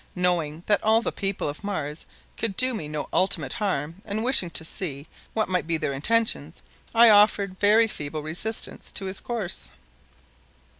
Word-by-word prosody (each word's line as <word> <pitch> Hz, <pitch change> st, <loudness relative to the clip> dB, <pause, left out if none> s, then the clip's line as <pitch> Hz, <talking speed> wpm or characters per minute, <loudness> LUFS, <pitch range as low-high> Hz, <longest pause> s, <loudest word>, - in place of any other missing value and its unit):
Knowing 175 Hz, -3 st, 0 dB
that 205 Hz, -1 st, +2 dB
all 220 Hz, +1 st, +4 dB
the -, -, 0 dB
people 195 Hz, -4 st, -2 dB
of 145 Hz, +7 st, -6 dB
Mars 155 Hz, -7 st, -4 dB, 0.3 s
could 215 Hz, -4 st, -3 dB
do 255 Hz, 0 st, +4 dB
me 165 Hz, -10 st, -4 dB
no 150 Hz, -1 st, -4 dB
ultimate 190 Hz, +2 st, +2 dB
harm 185 Hz, -6 st, -2 dB
and 215 Hz, +1 st, -3 dB
wishing 240 Hz, -8 st, +4 dB
to 160 Hz, -, -1 dB
see 150 Hz, -5 st, -5 dB, 0.3 s
what 220 Hz, -, +1 dB
might 180 Hz, -3 st, -1 dB
be 165 Hz, -1 st, +1 dB
their 140 Hz, -, -2 dB
intentions, 225 Hz, +11 st, -1 dB, 0.3 s
I 230 Hz, 0 st, +8 dB
offered 205 Hz, -2 st, +4 dB
very 215 Hz, +3 st, +5 dB
feeble 150 Hz, -6 st, -5 dB
resistance 180 Hz, +9 st, -4 dB
to 195 Hz, -, 0 dB
his 190 Hz, 0 st, -2 dB
course. 225 Hz, -7 st, -4 dB
190 Hz, 165 wpm, -25 LUFS, 160-220 Hz, 0.3 s, I